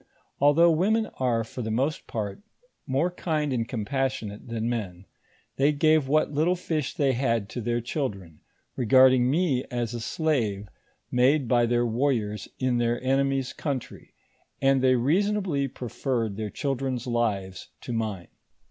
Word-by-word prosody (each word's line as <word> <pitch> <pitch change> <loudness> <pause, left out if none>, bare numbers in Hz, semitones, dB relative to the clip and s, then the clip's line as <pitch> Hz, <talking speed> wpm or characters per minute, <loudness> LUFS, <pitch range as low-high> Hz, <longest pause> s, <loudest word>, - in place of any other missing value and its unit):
Although 150 +4 +5
women 210 +7 +2
are, 120 -3 +1
for 115 +3 -7
the 110 - -3
moat 135 +8 0
part, 105 - -4 0.5
more 140 +7 +1
kind 155 -5 -1
and 115 -2 -1
compassionate 125 -3 -3
than 115 -1 -3
men, 100 -6 -4 0.5
they 140 +2 +4
gave 155 -1 +3
what 155 +2 +2
little 160 +5 +2
fish 155 -6 -3
they 135 -2 +2
had 115 -4 0
to 120 - -5
their 120 +1 -1
chil 135 +3 -1
dren, 90 -6 -12 0.4
regarding 130 0 +5
me 145 -4 +1
as 120 -1 -2
a 120 - -4
slave 110 -7 -1 0.4
made 130 +2 +3
by 120 -1 +3
their 120 0 +2
warriors 115 -3 -1
in 125 -2 0
their 120 0 +1
enemies' 135 0 +1
country, 140 -5 -5 0.4
and 135 -1 +3
they 130 0 +4
reasonably 170 - +1
preferred 120 -3 -3
their 110 0 -4
chil 140 +6 -2
dren's 130 -2 -3
lives 105 -6 -2
to 120 - -5
mine. 110 -6 -3
130 Hz, 150 wpm, -26 LUFS, 115-140 Hz, 0.5 s, Although